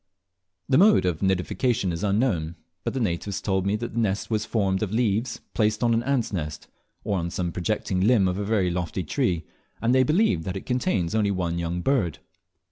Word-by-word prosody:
The 135 0 +4
mode 210 - +6
of 90 -3 0
nidification 95 +2 0
is 85 +2 -4
unknown; 100 -6 0 0.3
but - - -3
the - - 0
natives 95 -2 -2
told 95 -2 0
me 100 - +2
that 120 +2 -5
the 115 - -1
nest 105 0 -1
was 110 -1 0
formed 95 -4 0
of 105 -3 -1
leaves 115 +1 0
placed 110 +1 +1
on 120 -1 +3
an 115 - +2
ant's 125 -4 -1
nest, 75 -4 -4 0.4
or 100 -2 0
on 85 0 -2
some 90 0 -2
projecting 90 +1 -1
limb 105 -2 +4
of 90 +2 -1
a - - -1
very 100 -4 +1
lofty 90 +1 -2
tree, 90 - -1 0.3
and 115 +2 +2
they 130 - +5
believe 150 - +2
that 95 +3 -3
it - - -8
contains 125 - 0
only 110 -2 +2
one 85 -3 -1
young 85 +1 -2
bird. 105 - +1
100 Hz, 205 wpm, -25 LUFS, 90-115 Hz, 0.4 s, mode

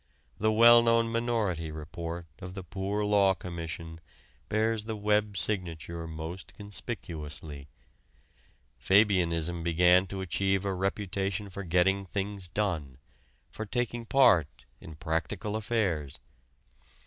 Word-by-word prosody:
The 110 +1 +3
well 120 +2 +8
known 115 0 +3
Minority 110 -9 0
Report 85 +2 -6
of 90 +1 -8
the 95 - -6
Poor 100 +3 -2
Law 100 -2 +4
Commission 80 -1 -6 0.5
bears 110 0 +1
the 110 0 -3
Webb 105 -1 +1
signature 85 -4 -3
most 80 +3 -7
conspicuously. 80 - -7 1.1
Fabianism 85 -2 +3
began 90 +3 +4
to 95 +1 -5
achieve 95 +3 0
a 100 - 0
reputation 95 +1 -2
for 100 - -6
getting 95 +3 +2
things 100 0 -4
done 85 -10 -2 0.5
for 110 - -6
taking 120 0 -2
part 90 - +4
in 80 - -10
"practical 85 +7 -2
affairs." 100 - -1
95 Hz, 115 wpm, -29 LUFS, 85-105 Hz, 1.1 s, well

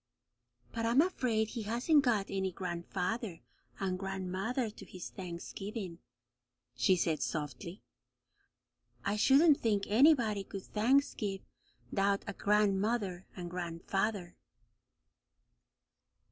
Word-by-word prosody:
"But 230 - -3
I'm 235 +4 +4
afraid 250 - +2
he 235 0 -4
hasn't 240 +8 +3
got 220 -6 +2
any 190 -1 -1
gran'father 180 - -3 0.4
and 185 -1 -1
gran'mother 195 +5 -2
to - - -12
his 180 -2 -8
Thanksgiving," 185 +1 -6 0.8
she 185 - +4
said 165 -3 0
softly. 170 +4 -4 1.2
"I 200 +1 +1
shouldn't 280 +7 +5
think 205 -3 +1
anybody 225 -4 +4
could 195 0 -7
thanksgive 215 -4 +1 0.5
'thout 200 0 +2
a 200 - -4
gran'mother 200 -1 +1
and 175 -2 -6
gran'father." 180 +2 -2
200 Hz, 100 wpm, -33 LUFS, 185-225 Hz, 1.2 s, shouldn't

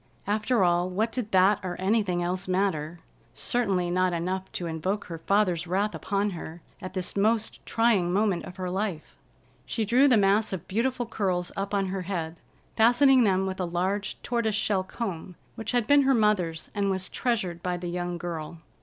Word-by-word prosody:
After 215 +2 +1
all, 175 0 +2
what 215 +5 -1
did 235 -4 -4
that 190 +2 +4
or 180 -2 -5
anything 190 -3 +1
else 180 +2 -2
matter? 180 -4 -1 0.4
Certainly 195 -8 0
not 185 0 +2
enough 185 +3 -3
to 175 - -3
invoke 170 +5 -2
her 165 -2 -7
father's 180 -2 +1
wrath 200 +4 0
upon 200 0 -1
her 165 -1 -8 0.2
at 185 0 -7
this 185 -1 -2
most 220 +2 0
trying 225 -7 +2
moment 200 -2 +1
of 180 - -10
her 185 -1 -3
life. 190 -4 -3 0.5
She 225 - -1
drew 250 +6 +5
the 250 -5 +5
mass 205 +1 +3
of 185 -1 -5
beautiful 240 +4 -1
curls 185 -6 -1
up 200 +1 -2
on 195 -1 0
her 190 0 -3
head, 170 -3 -4 0.4
fastening 245 +2 +5
them 190 -1 +2
with 190 0 -4
a 185 - 0
large 185 +4 -2
tortoise 235 -3 0
shell 205 -3 +1
comb 185 -4 -5 0.2
which 225 -2 -4
had 245 -2 +1
been 285 +4 +5
her 270 -1 +3
mother's 185 -7 +1
and 200 -1 0
was 190 -1 -1
treasured 195 -9 -2
by 180 0 -2
the 175 - -7
young 175 0 -3
girl. 170 -1 -5
190 Hz, 185 wpm, -27 LUFS, 175-215 Hz, 0.5 s, drew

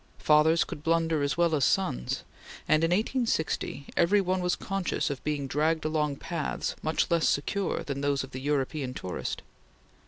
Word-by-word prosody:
Fathers 155 +2 +4
could 145 - -8
blunder 165 -1 +1
as 140 +2 0
well 170 -1 +3
as 145 -3 +2
sons, 60 - 0 0.4
and, 155 +1 +4
in 165 - +3
1860, 205 - 0
every 195 +5 +4
one 185 -1 0
was 180 0 +1
conscious 195 -6 -2
of 135 - -6
being 150 -2 -1
dragged 155 +4 0
along 150 -2 0
paths 165 +1 -3
much 155 +2 0
less 170 -1 +3
secure 190 +7 -1
than 140 -1 -4
those 140 -1 +1
of 135 - -9
the 130 - -6
European 140 -1 -1
tourist. 90 - -4
155 Hz, 165 wpm, -28 LUFS, 140-170 Hz, 0.4 s, Fathers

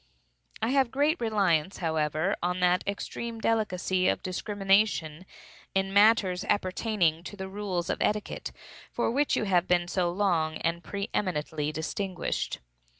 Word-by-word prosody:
I - - +2
have 265 -2 +3
great 290 +3 +1
reliance, 195 -6 +1
however, 160 +2 0
on 180 +1 -1
that 180 0 +3
extreme 225 +3 -4
delicacy 190 -5 +1
of - - 0
discrimination, 195 -3 0 0.5
in 195 0 0
matters 200 -3 +4
appertaining 185 -4 +1
to 205 - -8
the 190 0 -5
rules 190 -3 -3
of - - -2
etiquette, 210 0 -1 0.4
for 235 - 0
which 285 +4 +2
you - - 0
have 185 -3 +2
been 175 -1 +2
so 175 -1 0
long 170 -4 +1
and 165 +1 -1
so - - -15
pre 200 0 -4
eminently 155 -5 -1
distinguished. 180 +4 -3
190 Hz, 145 wpm, -28 LUFS, 175-210 Hz, 0.5 s, matters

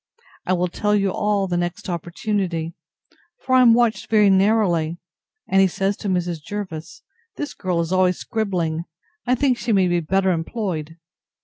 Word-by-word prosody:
I 185 - +2
will 180 0 +1
tell 210 +4 0
you 195 -2 +1
all, 205 0 0
the 175 -2 -1
next 175 0 -3
opportunity; 170 -1 -2 0.7
for 260 - 0
I 255 - +7
am 235 -2 +7
watched 235 -2 +1
very 210 -3 +5
narrowly; 190 -5 +2 0.5
and 195 0 +4
he 190 - +5
says 195 +2 -1
to 205 - -4
Mrs. 175 -3 -1
Jervis, 160 -5 -7 0.3
This 295 - -5
girl 180 -3 -2
is 165 +1 -4
always 185 -1 +3
scribbling; 175 -7 -2 0.4
I 250 - +3
think 255 -1 +1
she 235 - -2
may 190 -3 +4
be 175 0 +1
better 190 +3 +1
employed. 165 -3 -3
190 Hz, 170 wpm, -22 LUFS, 170-210 Hz, 0.7 s, I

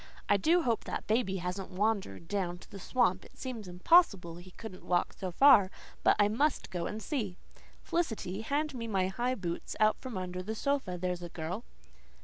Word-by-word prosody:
"I 205 - +5
do 330 - +3
hope 235 -3 0
that - - -4
baby 215 -3 +1
hasn't 180 +2 -4
wandered 190 - -1
down 180 -3 -1
to - - -16
the 200 - -8
swamp. 195 -3 +1
It - - -18
seems 240 -6 -6
impossible 180 - +4
he 175 +1 -12
could 185 0 -10
walk 175 -1 0
so 190 - -4
far; 205 -1 +7 0.3
but - - +5
I 205 -1 +5
must 270 +6 0
go 175 -2 -2
and 215 - -4
see. 220 - -3 0.5
Felicity, 220 - -2
hand 290 +5 -1
me 230 -3 -4
my 190 -4 +1
high 245 +6 -1
boots 175 -6 -4
out 215 0 +4
from 255 -6 -6
under 185 0 -4
the 215 +4 -4
sofa, 270 -8 -1
there's 180 0 -2
a 175 - -6
girl." 175 +8 -5
200 Hz, 190 wpm, -31 LUFS, 180-240 Hz, 0.5 s, far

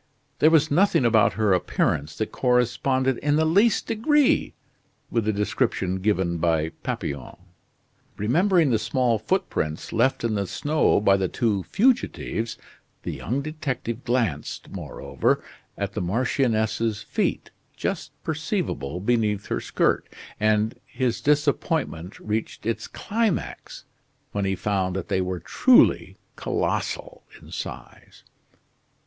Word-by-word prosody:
There 155 - +6
was 160 -2 +4
nothing 175 -4 +3
about 110 -3 +4
her 110 -3 +2
appearance 75 -4 0
that 110 - -2
corresponded 125 +1 +1
in 145 0 +1
the 160 +1 +3
least 200 +8 +3
degree 240 - +2 0.6
with 115 -3 0
the 110 - +2
descriptions 95 -2 -1
given 95 -4 +1
by 80 -1 +1
Papillon. 70 -3 -4 0.8
Remembering 165 - +3
the 110 - +2
small 120 -2 +1
footprints 110 - -2
left 120 +3 +2
in 115 -2 0
the 100 -2 -1
snow 150 - +2
by 100 -1 +4
the 95 -1 0
two 105 -2 0
fugitives, 115 - 0 0.5
the - - -3
young 135 +5 -3
detective 135 -6 -4
glanced, 115 - -2
moreover, - - -1 0.3
at - - -3
the - - -2
marchioness's 110 +1 0
feet, - - -2 0.3
just - - -3
perceivable 70 +6 -2
beneath 105 -1 0
her - - 0
skirt, - - 0 0.3
and 110 +1 +1
his 125 -3 -1
disappointment 145 - 0
reached 110 0 -4
its 115 -1 -2
climax 220 -3 -3 0.5
when 100 -1 -1
he 95 0 0
found 95 -2 -1
that 95 - -4
they 95 - +1
were 90 -1 -2
truly 250 - +4 0.2
colossal - - -2 0.2
in - - -15
size. - - -8
115 Hz, 125 wpm, -24 LUFS, 100-145 Hz, 0.8 s, There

